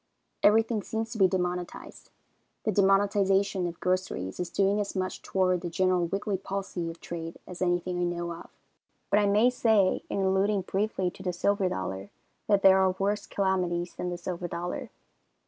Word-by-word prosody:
Everything 220 +1 +4
seems 225 +2 -4
to 225 - -5
be 190 - +7
demonetized. 180 -1 -4 0.5
The 215 - +1
demonetization 195 -1 +2
of 170 -1 -7
groceries 180 - -2
is 180 -1 -2
doing 200 +3 +2
as 205 -1 -3
much 185 -1 -2
toward 185 -2 +1
the 175 - -4
general 185 0 +1
wiggly 195 +2 -2
palsy 190 -3 -4
of 165 - -9
trade 165 -1 -6
as 180 0 -10
anything 175 0 0
I - - +1
know 175 0 -3
of. 170 - -11 0.6
But 205 - +5
I 205 - +3
may 215 +5 +4
say, 220 -6 +2
in 200 - -1
alluding 195 +1 +2
briefly 190 -1 -1
to - - -13
the 185 -1 -1
silver 200 +2 +1
dollar, 95 - -4 0.4
that 200 -2 +3
there 190 0 +7
are 190 -1 +2
worse 205 +2 -1
calamities 180 -3 0
than 180 - -4
the 175 - -4
silver 175 0 -4
dollar. 175 +1 -4
190 Hz, 175 wpm, -28 LUFS, 175-200 Hz, 0.6 s, be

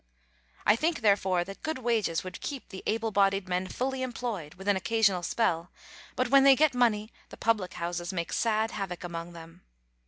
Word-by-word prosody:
I 210 - +6
think, 310 +3 0
therefore, 195 -4 +3
that 195 +2 -10
good 315 -2 -2
wages 230 -9 0
would 185 - -8
keep 275 -3 -6
the 190 -2 -8
able 225 +1 0
bodied 195 -1 +2
men 180 +1 -1
fully 260 +6 -2
employed, 235 -11 -4
with 190 +2 -10
an 205 - +4
occasional 200 -1 +2
spell, 175 -3 0 0.5
but 255 -1 0
when 275 +1 +6
they 275 -1 +8
get 305 0 +3
money 225 -3 +1 0.2
the - - -11
public 215 -5 0
houses 175 0 -3
make 170 -3 -3
sad 220 -1 +1
havoc 195 -4 -5
among 170 0 -6
them. 165 +1 -12
205 Hz, 185 wpm, -29 LUFS, 180-235 Hz, 0.5 s, they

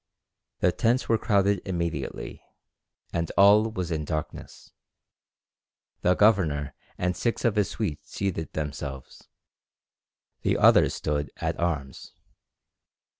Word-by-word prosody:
The 90 - +4
tents 120 +6 +1
were 115 -1 +2
crowded 100 -3 +2
immediately, 85 -6 -4 0.7
and 85 -1 -1
all 105 +3 +6
was 90 -5 -4
in 80 -1 -1
darkness. 75 +1 -6 1.3
The 90 +1 +3
governor 80 -10 +2 0.2
and 90 0 -1
six 120 0 -2
of 115 -3 +2
his 105 -2 +1
suite 75 -9 -3
seated 95 -5 -4
themselves, 70 -3 -6 1.1
the - - +1
others - - +5
stood 75 -1 -2
at - - -3
arms. 75 -6 -3
85 Hz, 110 wpm, -26 LUFS, 75-100 Hz, 1.3 s, all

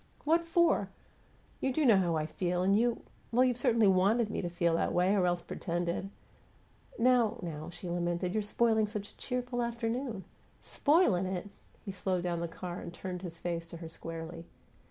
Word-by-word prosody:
"What 335 +2 +2
for? 340 0 +3 0.7
You 265 - 0
do 300 +3 +1
know 225 -6 +7
how 175 -3 +2
I 155 -1 0
feel, 180 +2 -1
and 195 +2 +4
you 235 +2 +1 0.3
well, 245 +2 +4
you've 250 -1 +2
certainly 235 -3 +3
WANTED 205 +4 +3
me - - -2
to 175 - -3
feel 170 -1 +1
that 165 - +1
way 180 +2 +3
or 190 -3 +3
else 175 -1 0
pretended 175 +2 -3 0.5
" - - -33 0.2
"Now, 240 -2 +3
now!" 155 -1 -5
she 175 +1 -8
lamented. 175 +1 -1
"You're 215 - +1
spoiling 220 +1 +2
such 205 -1 -5
a - - -27
cheerful 250 -1 -2
afternoon!" 235 -2 -2 0.4
"'Spoilin' 285 - +2
it!'" 190 +2 -4 0.3
He 195 - -3
slowed 185 -1 -1
down 175 -1 -1
the 170 - -2
car 175 +1 -6
and - - -7
turned 180 0 -6
his 170 -3 -7
face 170 -1 -3
to 170 - -9
her 165 0 -7
squarely. 165 +1 -7
190 Hz, 190 wpm, -31 LUFS, 175-235 Hz, 0.7 s, know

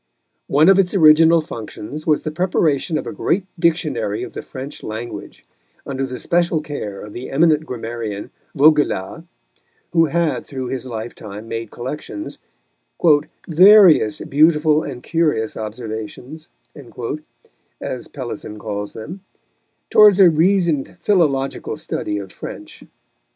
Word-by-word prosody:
One 150 +4 +4
of 195 0 +6
its 190 0 +1
original 165 -1 +6
functions 140 +3 -8
was 155 -2 +2
the 155 - -3
preparation 160 -2 0
of - - -4
a - - -5
great 180 +4 -1
Dictionary 175 - 0
of 380 - -8
the - - -5
French 135 +2 -9
language, 110 +2 -7 0.4
under 135 -1 -3
the 125 -1 -6
special 170 -1 +1
care 145 -10 -6
of 105 0 -10
the 125 - -7
eminent 155 +1 +2
grammarian, 115 -4 -5 0.2
Vaugelas, 150 - +2 0.7
who 165 -1 +5
had 165 +1 0
through 130 -3 -6
his 130 0 -4
lifetime 110 -2 -7
made 115 -1 -5
collections 150 - -7 1.1
"various 180 - +6
beautiful 155 +1 +3
and 130 -5 -7
curious 150 -10 0
observations," 110 +7 -7 1.3
as - - -5
Pellisson 105 - -7
calls 105 -1 -5
them 160 - -8 0.7
towards 210 -2 +7
a 185 -3 +8
reasoned 170 -3 +1
philological 145 -10 0
study 105 - -3
of 95 -2 -7
French. - - -10
150 Hz, 125 wpm, -19 LUFS, 115-170 Hz, 1.3 s, a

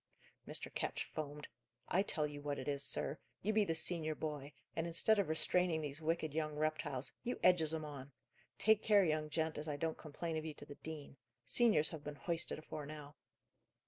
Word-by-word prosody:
Mr. - - 0
Ketch - - -1
foamed. 150 -1 -6 0.4
"I 185 - +3
tell 155 -6 0
you 145 -1 -6
what 145 -1 -2
it - - -5
is, 140 -1 +2
sir. 140 - +1 0.2
You 215 +3 +1
be 215 0 +5
the 165 - 0
senior 160 -1 +3
boy, 150 -2 -4 0.2
and, 165 +1 -1
instead 205 +6 +4
of 195 - +1
restraining 165 +1 +2
these 145 0 -4
wicked 160 -1 0
young 155 -1 -1
reptiles, 150 -3 -1
you 245 - -3
edges 165 -4 +6
'em 160 -1 -1
on! 140 -2 -8 0.5
Take 220 0 +4
care, 205 -2 +5
young 155 -1 0
gent, 160 0 -1
as 150 - -5
I 145 -1 -2
don't 160 +2 -2
complain 160 +1 -4
of 155 - -2
you 155 -2 -5
to 145 - -5
the 145 - -9
dean. 145 -2 -8 0.3
Seniors 215 -11 +4
have 155 -3 -7
been 150 0 -5
hoisted 170 +2 0
afore 155 -1 -6
now." 150 -1 -8
155 Hz, 200 wpm, -37 LUFS, 150-165 Hz, 0.5 s, edges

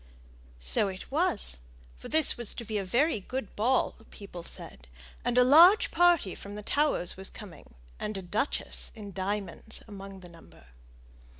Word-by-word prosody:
So - - +2
it 190 +4 -8
was, 300 - 0 0.4
for - - -11
this 315 -2 +4
was 240 -3 -1
to 235 - -5
be 215 -1 -2
a - - -2
very 240 - +1
good 250 +2 -6
ball, 250 +5 +1
people 195 -4 -10
said; 65 - -11 0.4
and 245 0 0
a 250 - +8
large 335 - +7
party 345 - +3
from 200 +1 -8
the 210 - -7
Towers 285 - 0
was 190 0 -3
coming, 195 - -12 0.2
and 210 -1 -3
a 190 - -6
duchess 210 +10 -1
in 205 -3 -8
diamonds 200 +3 -4
among 195 -2 -9
the 180 - -12
number. 170 - -17
210 Hz, 165 wpm, -29 LUFS, 190-260 Hz, 0.4 s, a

